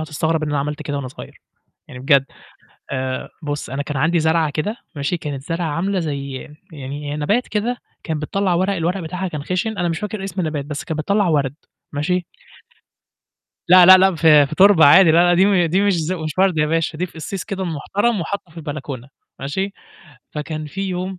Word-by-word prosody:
هتستغرب 160 +1 -1
إن 155 - -2
أنا 145 - 0
عملت 150 +2 -3
كده 145 -1 -4
وأنا 135 -2 -4
صغير. 125 - -12 0.5
يعني 125 - -9
بجد، 140 0 +4 0.7
آآ 130 -1 -3
بُص 145 -4 -4
أنا 135 +2 -2
كان 145 -1 -5
عندي 165 +5 +2
زرعة 160 0 +2
كده، 180 +10 -3 0.2
ماشي، 140 +5 -1
كانت 145 -5 -6
زرعة 165 +3 -3
عاملة 180 +5 -1
زي 140 -4 -4 0.4
يعني 145 0 -6
هي - - -3
نبات 205 +12 0
كده 225 +4 -1 0.3
كان 160 -2 -3
بتطلّع 185 +5 -1
ورق، 190 +3 +1
الورق 180 +2 -1
بتاعها 180 +3 -4
كان 150 -4 -5
خِشِن، 195 +6 -2
أنا 175 - 0
مش 165 -1 -2
فاكر 210 -1 -4
اسم 195 -1 -4
النبات، 155 -4 -2
بس 150 0 -6
كان 160 - -4
بتطلّع 200 +5 +1
وَرْد، 140 -4 +1 0.4
ماشي؟ 170 +5 -1 1.4
لأ، 180 0 +8
لأ، 185 - +11
لأ، 190 0 +4
في 155 -3 +6
في 155 - -6
تربة 190 -3 +6
عادي. 165 +4 +8
لا، 160 - +4
لا، 175 - +4
دي 185 - +5
م 190 -4 +3
دي 180 +4 +1
مش 205 -1 +3
ز 165 +1 -1
مش 155 -2 -5
وَرْد 190 -4 +3
يا 150 - +3
باشا، 160 0 -1
دي 180 - -1
في 170 - -19
أصيص 170 +4 -5
كده 195 -2 -4
محترم 195 +6 -1
وحاطُّه 180 +1 -5
في 160 - -21
البلكونة، 145 -5 -6 0.3
ماشي، 190 +9 -3 0.6
فكان 155 0 -5
في 180 +6 -7
يوم 185 +1 -4
160 Hz, 205 wpm, -20 LUFS, 150-185 Hz, 1.4 s, لأ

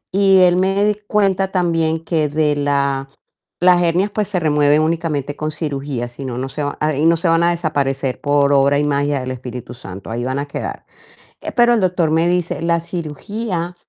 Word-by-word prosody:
Y 195 -1 +5
él 180 -1 +5
me 195 +2 +1
di 210 -1 +2
cuenta 195 -2 +1
también 165 -3 0
que 155 -3 0
de 150 0 +1
la 140 -1 0 0.6
las 180 0 +5
hernias, 175 +4 +1
pues 210 -2 -1
se 190 -4 -1
remueven 150 -1 +3
únicamente 155 -3 -2
con 155 - -2
cirugía, 140 -5 -4
si 130 +3 -9
no, 125 -2 -4
no 130 +1 -3
se 145 +2 -4
va 145 - -3
ahí 155 0 +1
no 165 0 +5
se 165 +1 0
van 165 0 +3
a 175 - +3
desaparecer 140 -5 -1
por 145 -1 +2
obra 140 +1 +4
y - - +1
magia 145 -1 0
del 130 0 -4
espíritu 125 -1 -7
santo, 100 -5 -10
ahí 120 +1 -3
van 130 +2 -2
a 145 - -4
quedar. 140 - -6 0.7
Pero 240 -1 +5
el 230 - +2
doctor 180 -3 +1
me 165 +2 +2
dice: 175 -2 -1
"La 170 0 +2
cirugía 175 +3 -4
155 Hz, 200 wpm, -18 LUFS, 140-175 Hz, 0.7 s, Y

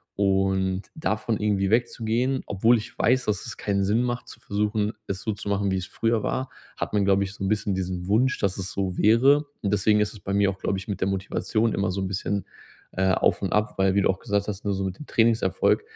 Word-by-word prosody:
und 95 -1 +1
davon 110 -6 -1
irgendwie 100 -2 +1
wegzugehen, 120 +2 +1
obwohl 110 +5 +3
ich 110 - -8
weiß, 125 +2 +3
dass 100 -3 -1
es 120 - -6
keinen 100 -1 0
Sinn 110 +5 +2
macht, 120 0 -3
zu - - -12
versuchen, 105 +1 0 0.2
es 95 -1 -3
so 110 - -2
zu 105 0 -7
machen, 100 -1 +1
wie 95 - +1
es 95 - -3
früher 115 +2 0
war, 130 +4 -2 0.3
hat - - -3
man, 100 -2 +2
glaube 100 0 +3
ich 95 0 -5
so 100 - -7
'n - - 0
bisschen 105 -1 0
diesen 90 -1 -3
Wunsch, 125 +6 +2
dass 100 -2 0
es 95 -1 -4
so 95 -2 -2
wäre. 135 +8 +5 0.2
Und, 100 0 0
deswegen 105 +1 +3
ist 105 - -1
es 105 - -12
bei 100 - -4
mir 100 0 +3
auch, 95 - -10
glaube 95 - -1
ich, 95 - -8
mit 100 -2 -3
der 95 - +2
Motivation 100 +3 0
immer 100 -1 0
so 95 +1 -3
'n 95 - -1
bisschen, 100 +1 -2 0.5
äh, 95 0 +1
auf - - +2
und - - -2
ab, 105 +1 +1
weil 95 0 +2
wie 100 - +4
du - - +2
auch 95 0 0
gesagt 100 -1 -1
hast, 105 -1 -5
ne, 100 - +1
so 95 0 -2
mit 95 -1 -4
dem 150 - -8
Trainingserfolg, 115 - +2
100 Hz, 250 wpm, -25 LUFS, 95-110 Hz, 0.5 s, wäre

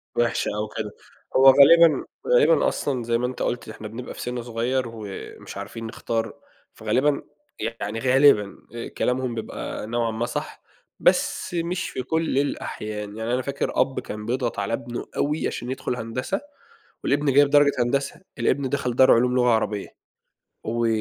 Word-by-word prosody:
وحشة 120 -1 +1
أوي 105 0 -2
كده، 105 -2 -3 0.4
هو 135 - +5
غالبًا 155 +4 +7 0.2
غالبًا - - +5
أصلًا 130 - -1
زي 115 0 +1
ما 125 +1 0
أنت 125 - -6
قُلت 120 - -2
إحنا 110 0 -8
بنبقى 115 +4 -7
في - - -9
سِنّ 125 0 -3
صغيّر 120 +3 -1
ومش 110 -4 -8
عارفين 115 0 -6
نختار، 115 0 -3 0.4
فغالبًا 130 +7 +1 0.4
يعني 115 0 -3
غالبًا 130 -5 +4 0.2
آآ، 115 - -5
كلامهم 125 -1 -1
بيبقى 110 -1 -5
نوعًا 115 0 0
ما 110 +2 -2
صح، - - -5 0.4
بس - - +1
مش 175 +2 -2
في 130 - -4
كل 160 +1 0
الأحيان، 105 -6 -4
يعني 110 +2 -2
أنا 125 - +1
فاكر 140 +1 -2
أب 135 - 0
كان 105 0 -7
بيضغط 120 -1 -1
على 100 +2 -2
ابنه 120 +1 -4
أوي 150 +2 0
عشان 120 +2 -4
يدخل 130 -1 -3
هندسة 130 - -3 0.6
والابن 145 0 +1
جايب 145 +1 +6
درجة 145 0 +5
هندسة، 140 +6 0 0.2
الابن 130 +3 +1
دخل 125 -3 -1
دار 130 +1 +6
علوم 125 +2 +3
لغة 125 -1 +3
عربية، 105 -3 0 0.8
و 115 +1 0
125 Hz, 160 wpm, -24 LUFS, 115-140 Hz, 0.8 s, غالبًا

